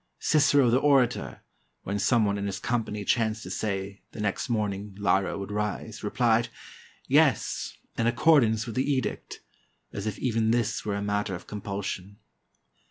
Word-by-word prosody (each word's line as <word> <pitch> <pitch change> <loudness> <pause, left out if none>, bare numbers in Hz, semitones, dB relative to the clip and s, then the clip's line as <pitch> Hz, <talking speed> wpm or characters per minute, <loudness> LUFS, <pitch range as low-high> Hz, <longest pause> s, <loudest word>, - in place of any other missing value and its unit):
Cicero, 145 -5 +4
the 125 - +4
orator, 135 -4 +2 0.4
when 100 +2 -2
some 115 +1 +3
one 100 0 0
in 100 - -2
his 100 -1 -3
company 110 -2 -2
chanced 110 -1 +1
to - - -7
say, 100 -1 -3
the - - -9
next 105 +4 -2
morning 105 -3 -2
Lyra 95 -1 +1
would 100 +1 -6
rise, 105 +1 -3
replied, 115 +2 +2 0.6
*'Yes, - - +2 0.2
in 115 - +2
accordance 120 -5 +4
with 115 - -6
the 130 +5 0
edict," 130 -6 -3 0.5
as 100 +1 -4
if 105 - -3
even 115 -3 0
this 115 -2 0
were 105 -1 -2
a 100 - -3
matter 105 -1 -1
of 85 - -9
compulsion. 100 -1 -5
105 Hz, 160 wpm, -27 LUFS, 100-120 Hz, 0.6 s, Cicero